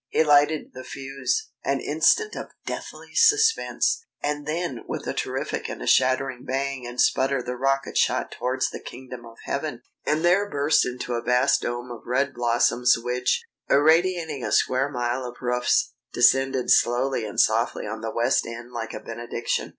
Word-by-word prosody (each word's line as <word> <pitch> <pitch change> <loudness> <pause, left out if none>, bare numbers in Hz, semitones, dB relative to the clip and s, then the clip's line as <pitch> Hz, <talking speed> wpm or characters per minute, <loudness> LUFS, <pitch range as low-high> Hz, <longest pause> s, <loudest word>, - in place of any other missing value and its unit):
He - - +3
lighted 150 0 +3
the 130 - -8
fuse.... 135 - -3
An - - 0
instant 440 -1 +2
of - - -6 0.2
deathly - - -7
suspense!... 450 0 +3 0.2
And 145 0 -2
then 160 -5 -2
with - - -5
a - - -2
terrific - - -3
and - - -6
a - - -6
shattering 130 -1 +2
bang 135 -1 -3
and 120 +1 -8
splutter 135 0 +2
the 125 +1 -4
rocket 135 +2 -1
shot - - +1
towards 125 +2 -1
the - - -6
kingdom 125 -1 -10
of 115 0 -14
heaven, - - -4 0.2
and 155 +3 0
there 195 +4 +3
burst 145 0 +2
into 125 0 -4
a 120 - -1
vast 125 +3 +2
dome 120 +1 -4
of 120 - -8
red 135 +2 0
blossoms 120 +1 +3
which, 125 +2 -1 0.3
irradiating 160 0 +3
a - - -3
square 130 +2 +2
mile 125 -1 -2
of 120 -1 -7
roofs, 125 0 +1 0.2
descended 135 +1 +3
slowly 120 +1 +3
and 105 -2 -4
softly 115 +2 +2
on 110 +1 -5
the 115 - -3
West 120 +4 +1
End 120 +1 -8
like 115 -2 -5
a - - -5
benediction. 120 +1 -3
130 Hz, 170 wpm, -24 LUFS, 120-145 Hz, 0.3 s, He